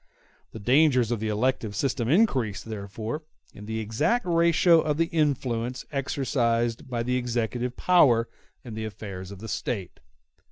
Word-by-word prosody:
The - - -9
dangers 125 +1 +3
of 120 - 0
the 110 - -2
elective 110 -1 -1
system 120 0 -1
increase, 135 - +2
therefore, 110 +5 -5 0.3
in 105 +1 -11
the 110 0 -3
exact 115 - 0
ratio 170 -1 +4
of 150 -2 -1
the 165 - +3
influence 130 -6 -1
exercised 125 -3 -1
by 120 -2 -2
the 125 +1 0
executive 120 0 -2
power 125 -11 +4 0.4
in 120 -4 -8
the 110 0 -4
affairs 100 -3 -7
of 100 +2 -9
State. 100 -2 -4
120 Hz, 145 wpm, -26 LUFS, 110-140 Hz, 0.4 s, ratio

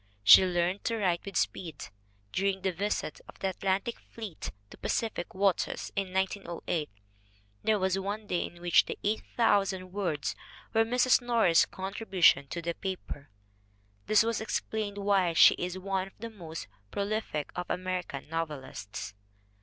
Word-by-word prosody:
She 190 - +10
learned 180 +1 0
to 230 -2 0
write 180 -5 +1
with 200 -3 -3
speed. 160 -6 -2 0.4
"Dur 195 +1 +1
ing 195 -1 0
the 190 - +2
visit 190 -3 -2
of - - -13
the 195 - -1
Atlantic 195 +5 -1
fleet 215 -8 -7 0.2
to - - -11
Pacific 220 -7 -2
waters, 195 -1 0
in 195 -2 -1
1908, 185 -4 -2 0.7
there 215 -1 +3
was 190 0 +1
one 205 +3 -4
day 175 -3 0
in 175 0 -15
which 175 -1 +5 0.2
8,000 200 -3 +1
words 175 -7 -2 0.4
were 225 0 +5
Mrs. 250 +3 +4
Norris's 230 -9 +4
contribution 190 -7 +2
to 170 +4 -5
the 170 0 -1
paper." 180 -7 -6 0.8
This 215 0 +5
may 230 -1 -1
explain 215 -2 -2
why 200 -4 +2
she - - +8
is 180 +1 -3
one 190 0 -2
of 195 - -15
the 230 +1 -7
most 165 -6 -8 0.2
prolific 200 - -2
of 180 0 -3
Ameri 185 0 -2
can 140 -2 -7
novelists. 140 -11 -5
190 Hz, 150 wpm, -30 LUFS, 175-205 Hz, 0.8 s, She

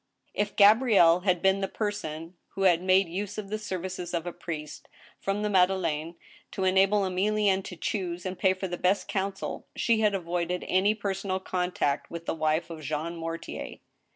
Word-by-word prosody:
If 205 0 -2
Gabrielle 205 -5 +6
had 180 -2 0
been 195 +1 +3
the 195 - 0
person 180 -6 -4 0.2
who 195 - -1
had 175 -3 +4
made 185 0 +4
use 195 +4 -4
of 205 -2 -5
the 215 +1 -3
serv 190 -4 -4
ices 180 -2 -4
of 170 0 -2
a 175 - -4
priest 150 -3 -7 0.3
from 200 +2 -2
the - - +1
Madeleine, 175 -4 +1 0.4
to 190 - -2
enable 195 +2 +4
Emilienne 195 +1 +1
to 180 - -7
choose 180 -1 -3
and 185 0 -3
pay 190 -1 +3
for 190 +1 -4
the 175 -1 -4
best 185 +3 +1
counsel, 195 -1 -3
she 230 -2 +2
had 210 -2 +3
avoided 175 0 -2
any 195 +3 +3
personal 195 -2 -2
contact 180 -6 -1
with 170 0 -7
the - - -1
wife 160 +1 0
of 160 -1 -7
Jean 155 +3 -3
Mortier. 165 0 -6
185 Hz, 180 wpm, -28 LUFS, 170-200 Hz, 0.4 s, Gabrielle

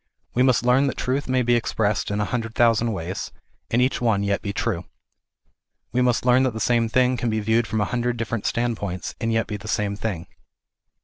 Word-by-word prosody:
We 125 - +2
must 130 -2 +3
learn 130 +3 +4
that 130 - -3
truth 130 +2 -1
may 130 -1 +2
be 120 0 +2
expressed 110 -3 0
in 105 +1 -1
a 105 - +1
hundred 115 +1 -3
thousand 115 -1 +3
ways, 95 -2 -4 0.4
and 120 +2 +3
each 130 0 0
one 110 -4 +2
yet 100 0 0
be 100 - -3
true. 90 -3 -2 1.1
We 125 - +1
must 125 -1 +1
learn 125 +1 +5
that 130 -4 0
the - - -3
same 115 0 +2
thing 125 +1 +2
can 120 0 -1
be 110 0 0
viewed 110 +2 +1
from 110 - -1
a - - +2
hundred 120 +2 -1
different 115 -1 -2
standpoints, 110 -6 -2
and 115 - 0
yet 115 0 +1
be 105 - -5
the 100 +2 -11
same 105 -1 -1
thing. 100 -6 -4
115 Hz, 215 wpm, -23 LUFS, 105-125 Hz, 1.1 s, learn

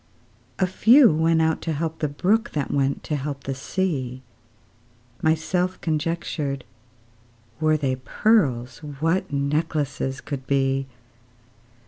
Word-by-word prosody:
A 190 - +3
few 230 - +6
went 160 +1 +3
out 160 0 +1
to 165 - -2
help 160 +2 -3
the 150 - 0
brook, 195 +10 0
That 145 -3 -2
went 140 0 0
to 150 - -2
help 140 -1 -4
the 135 - -3
sea. 130 -4 -2 1.0
Myself 175 +4 0
conjectured, 155 -3 -2 0.9
Were 155 0 +3
they 135 -3 -1
pearls, 130 - +1
What 155 +4 -1
necklaces 140 -1 -1
could 135 -3 -6
be! 135 -1 +1
150 Hz, 115 wpm, -24 LUFS, 135-165 Hz, 1.0 s, few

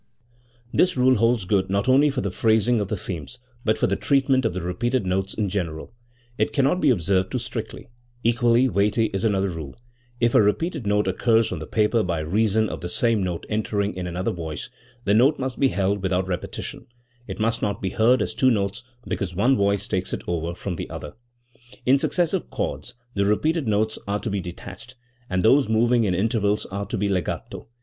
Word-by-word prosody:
This 180 -6 +3
rule 130 +1 +5
holds 115 -2 +2
good 95 -1 +1
not 100 +3 0
only 140 +3 +5
for 135 -2 -2
the 100 - -2
phrasing 110 +3 +2
of 105 - -1
the 105 - -2
themes, 80 -8 -6 0.3
but 110 0 +1
for - - +1
the 100 - +1
treatment 135 +1 +2
of 110 - 0
the 95 - -2
repeated 120 +7 -1
notes 95 +1 -1
in 105 -2 0
general. 90 -2 -4 0.5
It - - +1
cannot 145 +6 +2
be - - +4
observed 95 -3 +1
too - - -1
strictly. 115 -1 -6 0.4
Equally 120 +2 +3
weighty 105 0 +1
is 95 +2 -2
another 100 -3 +1
rule. 80 -5 -7 0.4
If 120 0 +2
a - - +6
repeated 135 - 0
note 105 0 +2
occurs 115 -1 +2
on 90 - -3
the 80 - -7
paper 110 +1 +2
by 85 -5 -1
reason 110 +6 +1
of - - -6
the 85 - -4
same 115 +1 +1
note 90 -3 -3
entering 105 -1 -1
in 90 -1 -5
another 90 +2 -2
voice, 80 -3 -6 0.3
the 100 - +2
note 130 +8 +4
must 130 -1 -4
be 135 - +5
held 100 -3 0
without 95 0 0
repetition; 90 -2 -5 0.4
it - - -6
must 115 +1 0
not 100 -1 -1
be 95 - -3
heard 120 +3 +3
as - - -4
two 130 - +3
notes 100 -2 -1 0.2
because 95 -5 -3
one 120 +8 +3
voice 100 -1 +1
takes 95 0 -2
it - - -4
over 85 0 -2
from 90 -1 -5
the - - -5
other. 75 - -7 0.7
In 135 +2 +5
successive 175 +4 0
chords, 125 - -4 0.2
the 100 - +1
repeated 155 +7 +1
notes 110 +1 0
are 100 +1 -1
to 110 - -3
be 100 -1 -1
de 90 -1 -6
tached, 110 +9 -11 0.3
and 95 0 0
those 135 0 +5
moving 115 +1 +3
in 95 -3 +1
intervals 105 +1 +1
are 100 +1 -4
to - - -3
be 100 +1 0
legato. 95 -4 -3
105 Hz, 205 wpm, -24 LUFS, 95-120 Hz, 0.7 s, a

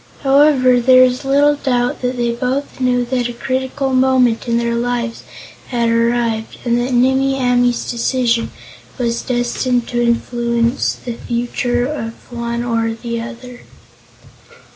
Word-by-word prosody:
However, 270 -2 +4
there 255 +1 +6
is 255 +1 +1
little 285 +2 +3
doubt 250 -3 -1
that 250 0 -2
they 240 -1 0
both 255 +4 -3
knew 250 -1 +1
that 245 -1 -1
a - - -5
critical 260 +2 -2
moment 255 -3 +2
in 235 0 +1
their 235 0 0
lives 235 0 -2 0.5
had 235 -2 0
arrived, 230 -1 0
and 235 -1 +2
that 245 +2 -2
Nimmie 265 +2 +2
Amee's 245 -1 +1
decision 235 -1 0 0.5
was 235 -2 -1
destined 245 0 -1
to 240 -1 -1
influence 235 +1 0
the 240 - -7
future 240 +1 -2
of 230 -6 -4 0.2
one 235 0 -3
or 230 -1 -1
the 235 0 -4
other. 245 +1 -9
245 Hz, 140 wpm, -17 LUFS, 235-255 Hz, 0.5 s, there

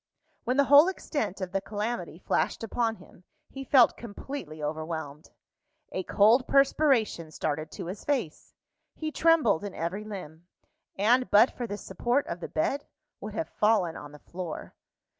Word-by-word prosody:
When 250 +2 0
the 280 - +6
whole 285 +4 +7
extent 255 - -3
of 185 -1 -4
the 195 0 -1
calamity 205 -4 -4
flashed 185 - -1
upon 225 +1 -1
him, 185 - -18 0.3
he 270 - -7
felt 260 -3 +5
completely 205 - -8
overwhelmed. 155 -1 -5 0.6
A 185 - -2
cold 220 +7 +4
perspiration 270 - +2
started 155 0 -3
to - - -6
his 185 +4 -7
face; 250 - -3 0.4
he 310 -1 -4
trembled 305 - +3
in 200 -2 -6
every 175 +6 -3
limb, 175 -6 -9 0.5
and 245 +6 +3
but 215 +5 +6
for 240 - -4
the 205 -1 -5
support 245 +6 -1
of 170 - -5
the - - -6
bed, 275 - -1 0.3
would - - -7
have 325 - -3
fallen 210 -6 +2
on 145 - -9
the 150 - -12
floor. 175 +1 -7
205 Hz, 160 wpm, -28 LUFS, 170-255 Hz, 0.6 s, whole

